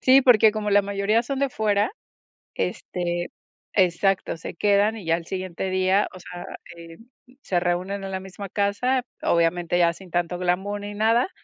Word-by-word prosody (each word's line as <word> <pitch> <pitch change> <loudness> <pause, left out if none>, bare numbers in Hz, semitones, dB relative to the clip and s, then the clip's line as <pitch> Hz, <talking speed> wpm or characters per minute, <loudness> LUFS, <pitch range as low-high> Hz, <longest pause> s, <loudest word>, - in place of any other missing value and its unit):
Sí, 265 +1 +6
porque 225 -4 +6
como 210 -1 -2
la 205 0 +5
mayoría 200 +3 +1
son 270 +2 -4
de 275 0 +1
fuera, 210 - 0 0.6
este 175 -1 -3 0.4
exacto, 190 0 +2
se 165 - -8
quedan 205 +3 +2
y 195 - -9
ya 165 0 +3
al 170 - -6
siguiente 185 0 -4
día, 185 +2 +2
o 185 - -10
sea, 175 0 -9 0.3
em, 170 +6 -13 0.3
se 180 -2 0
reúnen 185 +3 -2
en 195 - -5
la 190 - -2
misma 190 +1 -9
casa, 245 +7 0 0.2
obviamente 170 +1 +1
ya 170 -1 +4
sin 185 +1 -14
tanto 175 +1 -1
glamour 190 +3 -1
ni 205 0 -6
nada. 230 - +2
195 Hz, 175 wpm, -24 LUFS, 175-210 Hz, 0.6 s, Sí